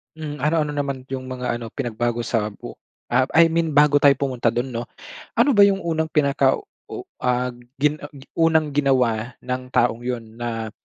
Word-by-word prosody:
Hmm, 150 Hz, -2 st, -6 dB
ano-ano 150 Hz, -1 st, +1 dB
naman 140 Hz, -2 st, -3 dB
'yung 130 Hz, -1 st, -5 dB
mga 125 Hz, -2 st, -3 dB
ano, 115 Hz, -2 st, -7 dB
pinagbago 120 Hz, -2 st, -2 dB
sa 110 Hz, -3 st, -1 dB
bu -, -, -10 dB, 0.3 s
ah, 125 Hz, +2 st, +3 dB
I 165 Hz, 0 st, +7 dB
mean 165 Hz, -1 st, 0 dB
bago 145 Hz, 0 st, +5 dB
tayo 145 Hz, 0 st, +6 dB
pumunta 125 Hz, -4 st, 0 dB
do'n 120 Hz, +2 st, -2 dB
'no. 120 Hz, -2 st, -4 dB, 0.5 s
Ano 285 Hz, -, +4 dB
ba 205 Hz, -6 st, +7 dB
'yung 195 Hz, -1 st, +1 dB
unang 160 Hz, -1 st, -1 dB
pinaka 140 Hz, -3 st, +2 dB, 0.3 s
u -, -, -7 dB, 0.2 s
ah, 125 Hz, 0 st, 0 dB, 0.2 s
gin 150 Hz, +1 st, +1 dB
ah, 145 Hz, -, -8 dB, 0.3 s
unang 160 Hz, -2 st, +3 dB
ginawa 125 Hz, -5 st, +1 dB
ng 125 Hz, 0 st, -4 dB
taong 120 Hz, -1 st, +2 dB
'yun 115 Hz, -2 st, -5 dB
na, 115 Hz, -2 st, -4 dB
130 Hz, 175 wpm, -22 LUFS, 120-150 Hz, 0.5 s, I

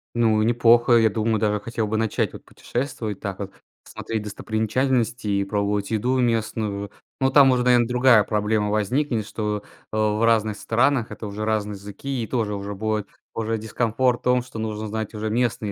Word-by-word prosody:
Ну 110 Hz, -2 st, +3 dB
неплохо. 120 Hz, +1 st, +4 dB
Я 115 Hz, -1 st, +5 dB
думаю, 110 Hz, 0 st, 0 dB
даже 105 Hz, -1 st, +1 dB
хотел 115 Hz, 0 st, -3 dB
бы 110 Hz, +1 st, -1 dB
начать 110 Hz, -2 st, 0 dB
вот -, -, -11 dB
путешествовать, 120 Hz, -6 st, -4 dB
так 95 Hz, -2 st, -5 dB
вот 100 Hz, -1 st, -5 dB, 0.3 s
смотреть 110 Hz, -2 st, -5 dB
достопримечательности 110 Hz, +3 st, -1 dB
и 100 Hz, -1 st, +1 dB
пробовать 100 Hz, 0 st, -1 dB
еду 125 Hz, +4 st, +1 dB
местную. 110 Hz, -4 st, -1 dB, 0.3 s
Но 135 Hz, 0 st, +3 dB
там 135 Hz, -2 st, +7 dB
уже, 125 Hz, -1 st, +2 dB
наверно, 120 Hz, -2 st, +4 dB
другая 125 Hz, -3 st, +5 dB
проблема 105 Hz, 0 st, 0 dB
возникнет, 110 Hz, +2 st, 0 dB
что, 105 Hz, -2 st, -3 dB, 0.3 s
э, 110 Hz, -, -3 dB
в 110 Hz, +1 st, +1 dB
разных 110 Hz, -2 st, +2 dB
странах 120 Hz, +1 st, +1 dB
это 110 Hz, -, -7 dB
уже 105 Hz, +1 st, -4 dB
разные 105 Hz, -1 st, -1 dB
языки. 105 Hz, +7 st, -5 dB
И -, -, -5 dB
тоже 110 Hz, -5 st, -1 dB
уже 100 Hz, 0 st, -5 dB
будет 110 Hz, 0 st, -2 dB, 0.3 s
уже 115 Hz, 0 st, -2 dB
дискомфорт 120 Hz, +3 st, 0 dB
в -, -, -36 dB
том, 125 Hz, 0 st, +3 dB
что 120 Hz, -3 st, -9 dB
нужно 110 Hz, -1 st, -3 dB
знать 110 Hz, +1 st, -4 dB
уже 110 Hz, 0 st, -3 dB
местный 115 Hz, -2 st, 0 dB
110 Hz, 180 wpm, -23 LUFS, 105-120 Hz, 0.3 s, там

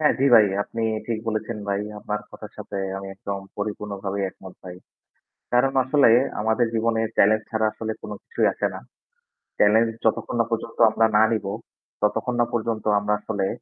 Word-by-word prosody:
হ্যাঁ 150 Hz, -, +4 dB
জি 135 Hz, -, +3 dB
ভাই 110 Hz, -3 st, +8 dB, 0.2 s
আপনি 115 Hz, +2 st, -5 dB, 0.2 s
ঠিক 115 Hz, -2 st, -1 dB
বলেছেন 110 Hz, 0 st, -2 dB
ভাই, 100 Hz, 0 st, 0 dB, 0.2 s
আপনার 105 Hz, 0 st, -3 dB
কথার -, -, -11 dB
সাথে 100 Hz, -, -6 dB, 0.2 s
আমি 95 Hz, 0 st, -7 dB
একদম 100 Hz, 0 st, -5 dB, 0.2 s
পরিপূর্ণভাবে 100 Hz, -1 st, -4 dB
একমত 95 Hz, 0 st, -13 dB
ভাই। 90 Hz, -1 st, -8 dB, 0.8 s
কারণ 125 Hz, +2 st, +3 dB
আসলে 135 Hz, -2 st, +4 dB, 0.3 s
আমাদের 110 Hz, +3 st, +2 dB
জীবনে 115 Hz, 0 st, +1 dB, 0.2 s
চ্যালেঞ্জ 110 Hz, +2 st, +4 dB
ছাড়া 110 Hz, -1 st, +1 dB
আসলে 110 Hz, 0 st, -4 dB
কোন -, -, -7 dB
কিছুই 465 Hz, -, 0 dB
আসেনা। -, -, -2 dB, 0.8 s
চ্যালেঞ্জ 110 Hz, +3 st, +5 dB, 0.2 s
যতক্ষণ 110 Hz, +1 st, 0 dB
না 115 Hz, -, +3 dB
পর্যন্ত 115 Hz, 0 st, -4 dB
আমরা 115 Hz, +1 st, +3 dB
না 105 Hz, -, +6 dB
নিব, 110 Hz, -3 st, -1 dB, 0.6 s
ততক্ষণ 115 Hz, +4 st, 0 dB
না 120 Hz, -, +3 dB
পর্যন্ত 115 Hz, -2 st, -2 dB
আমরা 105 Hz, +1 st, 0 dB
আসলে 100 Hz, -2 st, -2 dB
110 Hz, 165 wpm, -24 LUFS, 105-115 Hz, 0.8 s, ভাই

